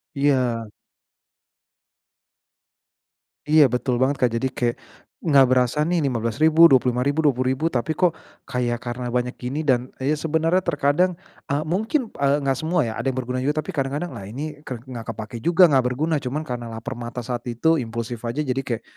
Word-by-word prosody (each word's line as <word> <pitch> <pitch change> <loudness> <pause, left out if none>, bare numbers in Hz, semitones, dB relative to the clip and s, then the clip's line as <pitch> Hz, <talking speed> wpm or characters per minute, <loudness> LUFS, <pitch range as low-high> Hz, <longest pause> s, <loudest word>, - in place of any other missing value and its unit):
Iya. 130 -5 +1 2.8
Iya 155 -3 +7
betul 125 0 -1
banget, 135 +2 +2
Kak. 120 - +3
Jadi 130 +3 0
kayak 120 -1 0 0.5
nggak 140 -5 +6
berasa 125 +1 +2
nih 175 -1 +1
Rp15.000, 140 +7 +4
Rp25.000, 130 +3 +2
Rp20.000. 130 +3 +1
Tapi 130 +1 -1
kok 170 0 +2 0.3
kayak 120 -1 -1
karena 120 0 -5
banyak 125 0 -1
gini 130 +5 -4
dan 125 -1 +1
ya 140 +4 +1
sebenarnya 160 +4 +1
terkadang, 165 +3 +2 0.4
eee, 145 +2 0
mungkin, 220 - 0 0.2
eee, 140 +1 +3
enggak 135 -2 0
semua 160 -5 +1
ya, - - -3
ada - - -3
yang 130 - -4
berguna 125 +1 -3
juga. 150 +2 0
Tapi 190 - -4
kadang-kadang, 145 +5 -2
"Lah 100 - -7
ini 150 +3 -6
ke 125 -6 -6
nggak 120 -4 -8
kepake 110 +1 -7
juga 175 +1 +6
enggak 135 -4 +3
berguna." 155 +5 0
Cuman 145 +5 -3
karena 120 -2 -5
laper 115 +1 -6
mata 120 +1 -6
saat 120 +1 -4
itu 160 +8 +2
impulsif 115 0 -4
aja. 120 +4 -3
Jadi 135 0 -2
kayak, 120 -3 -4
130 Hz, 170 wpm, -23 LUFS, 120-155 Hz, 2.8 s, Iya